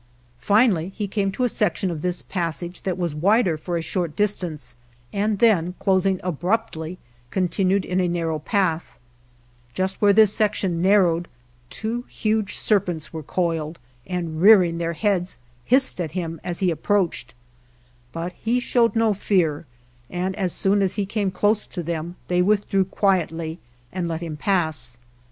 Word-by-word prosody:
Finally 200 - +3
he 210 -2 -2
came 195 -1 -1
to 225 +6 -2
a - - +4
section 195 -4 0
of 160 -3 -5
this 180 +1 -1
passage 175 -1 -3
that 185 -2 -2
was 175 -4 -1
wider 185 +3 +3
for 170 +3 -3
a 165 - -3
short 170 -3 -2
distance, 180 -11 -2 0.4
and 205 +1 0
then 180 -6 +3
closing 190 -1 +2
abruptly 180 -1 -2 0.3
continued 185 - +1
in 180 +1 -1
a 180 - +2
narrow 165 -2 -1
path; 175 -1 -1 0.8
just 190 +1 -1
where 205 -1 +6
this 210 0 +6
section 195 -5 +1
nar 200 +3 +5
rowed 170 0 0 0.4
two 225 +2 -3
huge 215 -2 -1
serpents 175 -8 0
were 160 - -4
coiled, 165 0 -2 0.3
and 170 -3 -3
rearing 185 -5 +6
their 170 0 -1
heads, 185 -1 0 0.3
hissed 260 -6 +3
at 160 -3 -4
him 165 -3 -4
as 175 -1 -3
he 180 - +3
ap 155 - -5
proached, 180 - 0 0.8
but 170 +4 -5
he 235 +6 0
showed 240 -1 +2
no 225 -1 +3
fear, 170 -7 0 0.4
and 185 +2 -2
as 190 -4 -1
soon 200 +3 +2
as 190 -2 0
he 205 -1 -1
came 205 0 -1
close 210 +3 +1
to 175 - -5
them 170 +1 -4
they 180 0 +2
withdrew 195 0 +2
quietly 170 -4 0 0.3
and 180 -2 -2
let 165 0 -3
him 165 -3 -5
pass. 155 -8 -1
180 Hz, 160 wpm, -23 LUFS, 165-205 Hz, 0.8 s, where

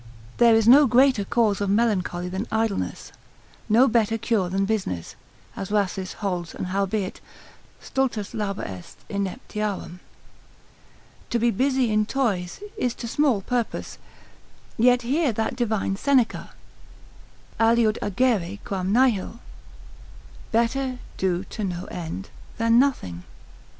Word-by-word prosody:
There 235 -1 +6
is 225 -1 +3
no 275 +4 +8
greater 255 -2 +4
cause 210 -1 +1
of 200 - 0
melancholy 195 -5 +1
than 190 +5 -4
idleness, 220 -2 -2 0.6
no 235 +5 +6
better 225 -2 +2
cure 215 -5 0
than 195 +2 0
business, 195 - -3 0.4
as 195 - -5
Rhasis 195 -2 -1
holds: 180 -4 -4
and - - -4
howbeit, 195 0 -1 0.6
stultus 245 -6 -2
labor 205 -2 -3
est 95 +1 -8
ineptiarum, 200 -2 -4 1.3
to 240 - +1
be 235 +1 +2
busy 260 +1 +1
in 215 0 +2
toys 215 - -1
is 245 -2 -1
to 235 - -6
small 260 -4 +2
purpose, 240 +2 -3 0.8
yet 245 +1 +4
hear 280 +3 +1
that 220 +3 -2
divine 220 -5 -1
Seneca, 260 +2 +1 1.1
aliud 225 -1 +3
agere 205 -3 0
quam 190 -1 -2
nihil, 230 -2 +2 1.1
better 250 +3 0 0.2
do 185 -1 0
to 215 +2 -6
no 180 -2 -3
end, 175 +3 -6 0.3
than 230 +1 +4
nothing. 170 - 0
215 Hz, 120 wpm, -24 LUFS, 195-240 Hz, 1.3 s, no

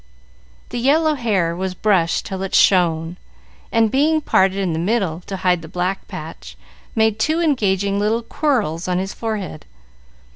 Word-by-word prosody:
The 245 - -4
yellow 305 +5 +3
hair 200 - 0
was 185 +1 -3
brushed 180 -5 +1
till 190 -1 -5
it 195 - -2
shone, 170 -2 +3 0.5
and 225 -2 +3
being 310 +4 +3
parted 190 -9 +2
in 190 -4 -1
the 160 - -2
middle, 185 -3 0
to 195 - -4
hide 180 -2 +1
the 160 - -10
black 180 +3 -3
patch, - - -9 0.4
made 220 -1 +2
two 310 +8 +1
engaging 200 - +1
little 220 +3 0
"quirls" 220 - -1
on 180 -1 0
his 190 +2 -3
forehead. 210 -8 -5
195 Hz, 155 wpm, -20 LUFS, 180-230 Hz, 0.5 s, yellow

